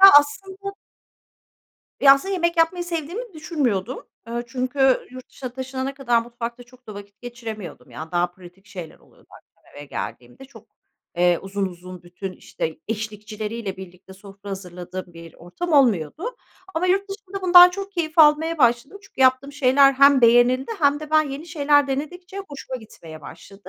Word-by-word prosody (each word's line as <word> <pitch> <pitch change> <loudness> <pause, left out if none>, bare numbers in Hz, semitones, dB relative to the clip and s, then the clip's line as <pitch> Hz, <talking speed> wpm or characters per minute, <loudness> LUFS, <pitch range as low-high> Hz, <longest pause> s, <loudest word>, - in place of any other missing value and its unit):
Ya 390 0 +11
aslında 385 +7 -5 1.3
Ya, 275 -1 +9
aslında 380 +9 -4
yemek 340 -2 0
yapmayı 345 +2 +2
sevdiğimi 345 +8 -5
düşünmüyordum. 260 - -2 0.2
Eee, 235 +1 -3
çünkü 260 +1 +1
yurt 255 0 -11
dışına 255 -2 -7
taşınana 260 +1 -4
kadar 240 -4 +1
mutfakta 240 +1 -7
çok 250 +1 -21
da 215 - -9
vakit 200 0 -12
geçiremiyordum. 230 -5 -8
Yani, 160 +1 -8
daha 175 0 +2
pratik 180 +2 -17
şeyler 180 -6 -9
oluyordu, - - -25
akşam - - -20
eve 145 - -8
geldiğimde. 125 - -7
Çok, 275 - -16 0.5
eee, 175 -1 +3
uzun 195 0 -2
uzun 180 0 -10
bütün, 180 +2 -7
işte, 160 -3 -6
eşlikçileriyle 215 -1 -5
birlikte 190 0 -12
sofra 195 +1 -12
hazırladığım 180 -1 -7
bir 165 -1 -12
ortam 320 - -6
olmuyordu 275 - +2 0.4
ama 335 +3 0
yurt 390 +2 +1
dışında 390 -1 -8
bundan 355 -1 +9
çok 395 +2 -7
keyif 330 -3 -3
almaya 315 +2 +5
başladım. 240 +9 +2
Çünkü 390 - -12
yaptığım 260 +2 +3
şeyler 275 0 +5
hem 275 0 +6
beğenildi 245 - +4
hem 290 -2 +2
de 305 -1 -8
ben 310 0 +5
yeni 285 +5 -7
şeyler 290 -3 +3
denedikçe 350 +8 -5
hoşuma 270 -2 -7
gitmeye 165 -9 -12
başladı, 190 +6 -13
255 Hz, 155 wpm, -22 LUFS, 195-310 Hz, 1.3 s, Ya